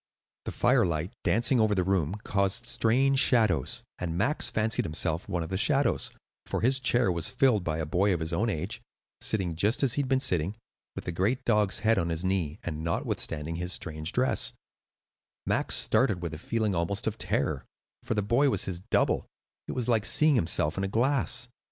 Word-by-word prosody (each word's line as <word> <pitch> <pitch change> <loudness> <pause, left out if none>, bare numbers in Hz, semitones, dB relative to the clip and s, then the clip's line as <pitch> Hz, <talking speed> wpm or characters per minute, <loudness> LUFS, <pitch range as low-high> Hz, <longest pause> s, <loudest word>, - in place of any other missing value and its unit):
The - - -3
firelight, 85 +4 +1
dancing 120 +2 +2
over 110 -2 +3
the 90 - +1
room, 90 -2 0
caused 100 +3 0
strange 130 +4 +2
shadows; 110 - +2 0.2
and 85 -2 -3
Max 140 +5 +1
fancied 110 -1 +1
himself 80 +3 -2
one 90 -3 -1
of 80 - -7
the 95 - -2
shadows, 140 +4 +1 0.4
for - - -2
his 130 +4 +2
chair 120 -5 +2
was 85 -2 -1
filled 130 -6 +2
by 80 -2 -2
a 80 - -2
boy 95 +6 +1
of 90 - 0
his 80 +1 -4
own 110 +7 +1
age, 80 -7 -3 0.4
sitting 95 -6 -1
just 105 - +2
as 130 -4 +2
he 145 - +1
had 135 - -4
been 130 -1 +3
sitting, 90 - 0 0.4
with - - -6
the - - -2
great 100 +9 -1
dog's 105 -3 +1
head 115 +1 +3
on 85 - -1
his 80 +1 -2
knee; 95 -5 -1
and 80 -2 -5
notwithstanding 80 -1 -2
his 90 +1 -4
strange 80 0 -5
dress, 130 +1 +1 0.9
Max - - +1
started 90 -2 +2
with 85 -2 -4
a 75 - -7
feeling 110 +2 -1
almost 90 +4 -2
of 110 0 -3
terror, - - -1 0.4
for 115 - -3
the 105 - 0
boy 120 +7 +3
was - - 0
his 90 -2 -4
double; 95 - 0 0.4
it - - -4
was 125 -2 -2
like 115 -4 +2
seeing 155 +5 +4
himself 85 - +1
in - - -1
the 95 - 0
glass. 125 +4 +1
100 Hz, 195 wpm, -28 LUFS, 85-115 Hz, 0.9 s, seeing